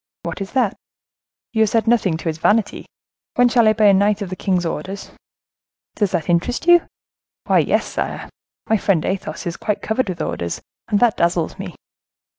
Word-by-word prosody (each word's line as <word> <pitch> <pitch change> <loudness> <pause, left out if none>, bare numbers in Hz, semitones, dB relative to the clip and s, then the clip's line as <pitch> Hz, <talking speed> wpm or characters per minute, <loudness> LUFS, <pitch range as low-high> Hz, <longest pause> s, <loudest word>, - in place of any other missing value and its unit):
"What - - -5
is 195 - -6
that?" 245 -7 +1 0.8
"You 220 - +1
have 220 - +4
said 225 +1 +1
nothing 220 -8 +2
to 165 - -7
his 160 0 -2
vanity; 210 +3 +1 0.5
when 245 0 +5
shall 235 -2 +4
I 215 - +5
be 215 0 0
a 200 - +7
knight 205 +2 +2
of 190 - -7
the - - -3
king's 180 -2 0
orders?" 190 +5 -5 0.8
"Does 205 -3 0
that 175 -5 -2
interest 175 - 0
you?" 345 0 +6 0.6
"Why, - - +4
yes, - - +1
sire. - - -4 0.4
My 220 - +3
friend 190 -5 +1
Athos 185 -5 -3
is 170 -1 -4
quite 210 - -2
covered 220 0 0
with 180 - -4
orders, 85 0 -3 0.3
and 210 -3 +1
that 240 -3 +3
dazzles 170 -1 0
me." - - -7
200 Hz, 190 wpm, -20 LUFS, 175-220 Hz, 0.8 s, a